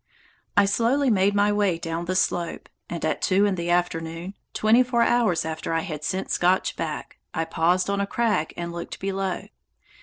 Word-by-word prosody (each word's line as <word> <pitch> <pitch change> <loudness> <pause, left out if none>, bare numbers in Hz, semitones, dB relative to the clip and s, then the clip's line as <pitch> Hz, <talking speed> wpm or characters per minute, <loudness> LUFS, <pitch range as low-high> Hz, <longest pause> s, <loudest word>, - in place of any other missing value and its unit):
I 205 - +7
slowly 240 +6 +2
made 200 0 +3
my 205 0 +3
way 205 -4 +1
down 165 +1 -4
the 185 +1 -2
slope, 175 -1 -1 0.2
and 170 -2 -3
at 155 - -1
two 195 +2 +3
in 200 - +2
the 170 -1 -3
afternoon, 175 +1 -1 0.2
twenty 220 +3 +4
four 245 -2 +2
hours 220 -11 +2
after 160 +1 -3
I 165 - +1
had 155 -4 -6
sent 190 +3 -2
Scotch 180 +2 +2
back, 155 -2 -5 0.2
I 165 - 0
paused 170 +3 +1
on 200 0 0
a 200 - -1
crag 210 -8 0
and 170 0 -4
looked 170 0 -6
below. 195 -1 -2
185 Hz, 185 wpm, -25 LUFS, 165-205 Hz, 0.2 s, I